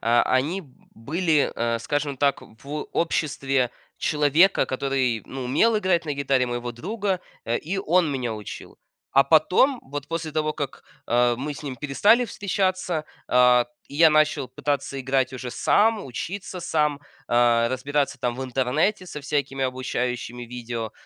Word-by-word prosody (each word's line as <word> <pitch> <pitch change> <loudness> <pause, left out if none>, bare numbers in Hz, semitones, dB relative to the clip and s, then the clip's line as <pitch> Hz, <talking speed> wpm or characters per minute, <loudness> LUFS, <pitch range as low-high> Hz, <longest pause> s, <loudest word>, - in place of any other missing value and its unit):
а, 120 +1 +3
они 145 +9 +1
б 135 - -20 0.2
были, 155 +5 +1
э, 115 0 0
скажем 145 +1 -2
так, 140 +1 +1
в 140 +7 -7
обществе 135 -6 0 0.3
человека, 150 +5 +3
который, 130 -4 -1
ну, 130 -1 -6
умел 220 - +3
играть 185 -5 +1
на 150 - -2
гитаре 135 -2 +1
моего 120 0 -3
друга, 190 - -2 0.2
а, 115 - 0
и 185 +5 -3
он 180 -3 +2
меня 125 -5 -2
учил. 105 -2 -9 0.3
А 135 0 +6
потом, 180 - +4
вот 145 +1 -6
после 165 -1 -3
того, 155 0 0
а, - - -3
как 145 -3 -6 0.5
мы 145 +3 -4
с 145 - -10
ним 135 -3 -5
перестали 205 - +3
встречаться, 185 -5 -1 0.2
а, 125 -1 +5 0.2
и 140 - -9
я 160 0 +7
начал 155 -2 +2
пытаться 140 -1 -2
играть 130 0 0
уже 125 -1 -6
сам, 220 - +2
учиться 180 - -6
сам, 150 -3 0 0.3
а, 120 -1 +4
разбираться, 140 +2 -1
там, 120 0 -1
в 130 - -4
интернете 135 - 0
со 150 - -7
всякими 140 -2 -1
обучающими 125 -1 -3
видео, 120 -2 -5
140 Hz, 155 wpm, -24 LUFS, 125-160 Hz, 0.5 s, я